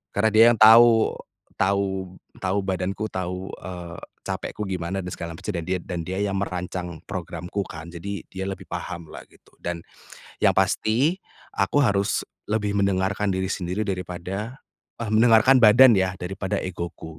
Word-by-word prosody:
Karena 110 +2 +3
dia 110 +2 +7
yang - - -3
tahu 115 +1 +7 0.4
tahu 95 -1 0 0.2
tahu 95 +2 -1
badanku 95 +2 -2
tahu, 90 +1 -4
eee, 85 -1 -7 0.2
capekku 105 - -4
gimana 95 0 -3
dan 90 - -5
segala 85 -1 -6
macam, - - -4
dan 85 - -3
dia 95 0 0
dan 90 -2 -5
dia 95 +2 -3
yang 95 -1 -1
merancang 90 -3 -4
programku 90 +1 -4
kan, 80 +1 -9
jadi 95 +2 -6
dia 95 0 -5
lebih 95 - -7
pahamlah 85 -2 -6
gitu, - - -24
dan 85 -1 -4 0.6
yang - - +5
pasti 135 +12 +2 0.4
aku 145 - +2
harus 100 -5 +1 0.3
lebih 105 -1 0
mendengarkan 100 +1 +1
diri 95 0 -1
sendiri 90 +2 -2
daripada 95 +5 -5 0.4
eh, 110 - -3
mendengarkan 115 +4 +6
badan 115 +2 +8
ya, 95 -1 0
daripada 95 +1 -3
egoku. 85 -3 -6
95 Hz, 150 wpm, -24 LUFS, 90-105 Hz, 0.6 s, badan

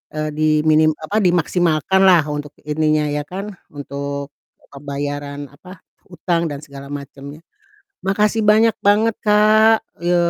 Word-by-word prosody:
eee, 155 0 -2
diminim 155 0 +3
apa, 160 +7 -4
dimaksimalkanlah 175 0 +3
untuk 145 0 -5
ininya 155 0 +1
ya 145 0 -2
kan 195 +3 -6 0.2
untuk 140 0 -6 0.4
pembayaran 145 0 -6
apa, 180 +6 -15 0.3
utang 170 -1 -1
dan 145 -1 -7
segala 140 -2 -11
macemnya. 140 +1 -9 0.6
Makasih 210 +3 +1
banyak 220 +1 +4
banget 210 +2 +3
Kak, 215 +1 +4 0.2
ye 175 +1 +2
155 Hz, 115 wpm, -19 LUFS, 145-190 Hz, 0.6 s, banyak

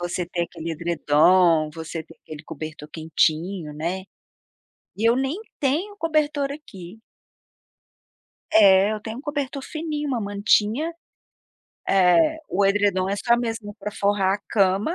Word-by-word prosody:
Você 175 0 -2
ter 175 0 -2
aquele 165 -1 -7
edredom, 165 0 +3
você 160 0 -6
ter 160 - -17
aquele 155 -1 -10
cobertor 155 -1 -8
quentinho, 160 +1 -1
né. 175 +5 -3 0.9
E 220 +2 +2
eu 235 - +3
nem 265 +4 -1 0.2
tenho 320 +10 -1
cobertor 305 -4 0
aqui. 200 - -11 1.5
É, 200 -1 +6
eu 215 - -3
tenho 220 +2 -7
um - - -8
cobertor 285 -2 -3
fininho, 305 -1 -4
uma 255 -4 -1
mantinha, 210 +8 +1 1.0
eh, 195 - +4
o 200 +2 +1
edredom 195 -2 +2
é 200 - 0
só 235 +3 +2
mesmo 225 -3 -4
para 210 +1 -5
forrar 200 -2 +1
a - - -4
cama, 200 - +2
200 Hz, 135 wpm, -23 LUFS, 175-265 Hz, 1.5 s, É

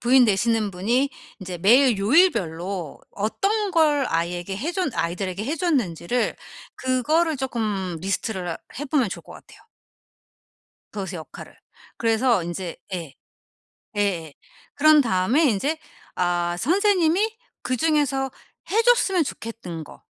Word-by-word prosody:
부인 250 +1 +5
되시는 220 0 +1
분이 235 +10 +1 0.3
인제 180 -2 -6
매일 240 +5 +5
요일별로 195 - +1
어떤 395 - -1
걸 300 -5 +3
아이에게 175 +3 -2
해 300 - -3
줬 365 -4 -1
아이들에게 185 +4 -2
해 300 +6 -2
줬는지를 245 - 0 0.4
그거를 300 +6 +1
쪼끔 215 -9 -2
리스트를 190 0 -2
하 165 - -4 0.2
해 290 - -3
보면 270 -5 +1
좋을 - - -7
것 - - -13
같아요. - - -15 1.3
그것의 195 -2 -5
역할을. 160 -3 -10 0.4
그래서 230 -3 +2
인제 175 +1 -5 0.2
예. 165 -6 -6 0.8
예예. 175 -7 -1 0.4
그런 310 +1 +6
다음에 230 - +2
인제 275 +6 +1 0.4
아 175 -1 0
선생님이 385 - +2 0.3
그중에서 270 0 +1 0.4
해 445 +3 +3
줬으면 405 -7 +3
좋겠던 220 - -7
거. - - -15
230 Hz, 270 characters per minute, -23 LUFS, 185-300 Hz, 1.3 s, 그런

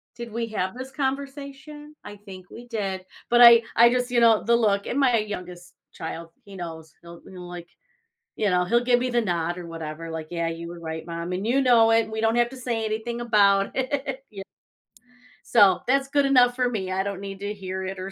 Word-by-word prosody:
"Did 235 -1 -8
we 230 +1 -3
have 190 -3 -3
this 260 +1 -8
conversation? 280 +2 -5
I 205 0 -10
think 190 -3 -13
we 240 +1 -12
did," 195 -5 -4 0.2
but 240 0 +4
I 235 -1 +10
I 235 +1 +7
just 250 0 -1
you 245 - +3
know, 230 -2 +4
the 235 0 +3
look 200 -3 +1
and 270 - -1
my 255 -4 +3
youngest 180 -4 -7 0.2
child, 165 +1 -7 0.2
he 200 -1 -12
knows, 160 -3 -8
he'll 170 0 -13
he'll, 180 -1 -10
like 175 -1 -9 0.7
you 210 - 0
know, 180 -1 +2
he'll 235 +6 +2
give 245 0 +3
me 255 +1 -1
the 240 -1 +1
nod 175 -4 -2
or 180 - -7
whatever, 165 0 -7
like, 160 -1 -6
"Yeah, 170 -1 -2
you 165 0 -6
were 175 0 -9
right, 160 -1 -6
mom, 170 +1 -5
and 185 +3 -3
you 265 +4 +2
know 235 -3 +5
it; 225 -1 +2
we 220 0 -3
don't 225 +1 +2
have 240 0 +3
to 265 - -11
say 235 -3 -3
anything 220 +2 -3
about 200 -4 +3
it," 270 0 -3
y 195 -2 -8 1.1
So, 205 -5 +6
that's 275 +1 +1
good 285 -1 +2
enough 250 -2 +4
for 250 -1 +1
me, 190 -6 -4
I 190 +1 0
don't 200 -1 -4
need 195 -1 -7
to 205 +1 -4
hear 190 -1 -5
it 190 0 -5
or 185 +1 -6
215 Hz, 220 wpm, -24 LUFS, 180-245 Hz, 1.1 s, I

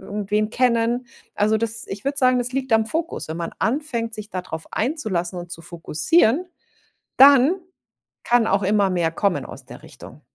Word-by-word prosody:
irgendwen 210 +1 -2
kennen. 240 0 +1 0.3
Also, 215 +1 +2
das 230 +1 -3
ich 195 +1 -7
würde 280 +1 -1
sagen, 255 -2 +4
das 245 0 -2
liegt 260 -3 0
am 220 - +3
Fokus. 320 - -4
Wenn 160 +1 -5
man 170 -1 -4
anfängt, 235 -3 -2
sich 215 -1 -7
da 185 -3 -5
drauf 160 -3 -8
einzulassen 215 - -2
und 175 0 -8
zu 165 -1 -7
fokussieren, 175 - +1 0.7
dann 275 +4 +7 0.7
kann 240 -1 +3
auch 195 0 +1
immer 200 0 +2
mehr 170 -3 0
kommen 195 +2 -1
aus - - -11
der - - -13
Richtung. - - -13
220 Hz, 175 wpm, -22 LUFS, 190-255 Hz, 0.7 s, dann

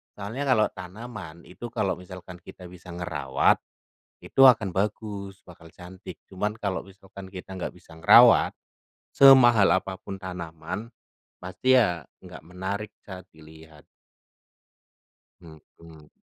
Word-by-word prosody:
Soalnya, 110 +8 -5
kalau 110 -5 +3
tanaman 95 -3 -10
itu, 105 +6 -10
kalau 95 -6 -1
misalkan 90 0 -11
kita 90 -1 -13
bisa 90 -1 -12
ngerawat, 75 -6 0 0.6
itu 135 - 0
akan 110 -8 +5
bagus, 100 -1 -4
bakal 85 -2 -15
cantik. 90 +1 -12
Cuman, 100 +2 -3
kalau 100 -3 -3
misalkan 95 0 -14
kita 95 0 -9
enggak 90 - -5
bisa 90 -2 -18
ngerawat, 80 0 +6 0.6
semahal 120 -6 +6
apa 95 0 -3
pun 95 - -8
tanaman, 90 +3 -7 0.6
pasti 95 +8 0
ya 90 -9 +1 0.2
enggak - - -12
menarik 95 +4 -5
saat 95 -2 -11
dilihat. 80 -1 -16 1.6
Mhm, 80 -2 -15 0.2
mhm. 80 -2 -16
95 Hz, 120 wpm, -25 LUFS, 85-105 Hz, 1.6 s, ngerawat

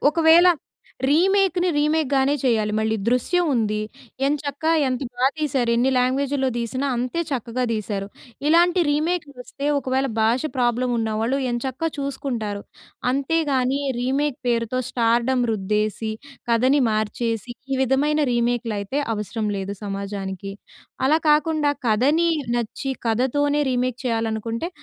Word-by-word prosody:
ఒకవేళ 330 +2 +6 0.6
రీమేక్‌ని 370 +3 +3
రీమేక్‌ 300 -1 +1
గానే 270 +2 +3
చేయాలి 220 -4 +1
మళ్ళీ 220 0 0
'దృశ్యం' 315 +8 +2
ఉంది. 215 -2 0 0.5
ఎంచక్కా 290 +2 -1 0.2
ఎంత 255 -1 -2 0.2
బా 255 - +3
తీశారు 270 -6 0
ఎన్ని 255 +3 +3
లాంగ్వేజులో 265 +2 +1
తీసినా 250 +4 -2
అంతే 255 +7 -2
చక్కగా 250 -1 -2
తీశారు. 205 -2 -3 0.4
ఇలాంటి 345 +3 +4
రీమేక్‌లు 305 0 -1
వస్తే 275 +3 -6
ఒకవేళ 265 0 0
భాష 230 +3 +3 0.2
ప్రాబ్లమ్ 245 0 +1
ఉన్న 220 -1 -1
వాళ్ళు 250 +5 0
ఎంచక్కా 260 +6 -2
చూసుకుంటారు. 245 -7 -3 0.5
అంతేగాని 275 -1 +1 0.2
రీమేక్ 275 +2 0
పేరుతో 235 +1 0
స్టార్‌డ‌మ్ 240 +2 +2
రుద్దేసి, 215 +1 -1 0.4
కథని 255 +5 +3
మార్చేసి 225 +2 -2 0.2
ఈ - - +1
విధమైన 290 +4 +2
రీమేక్‌లయితే 235 0 -1
అవసరం 210 +1 -3
లేదు 195 +1 -4
సమాజానికి. 195 -1 -5 0.5
అలా 310 +3 +4
కాకుండా 300 -1 +2 0.2
కథని 290 +10 +3 0.3
నచ్చి, 240 +3 -3
కథతోనే 285 +6 +1
రీమేక్ 250 0 -1
చేయాలనుకుంటే, 225 +5 -2
255 Hz, 115 wpm, -23 LUFS, 225-290 Hz, 0.6 s, ఒకవేళ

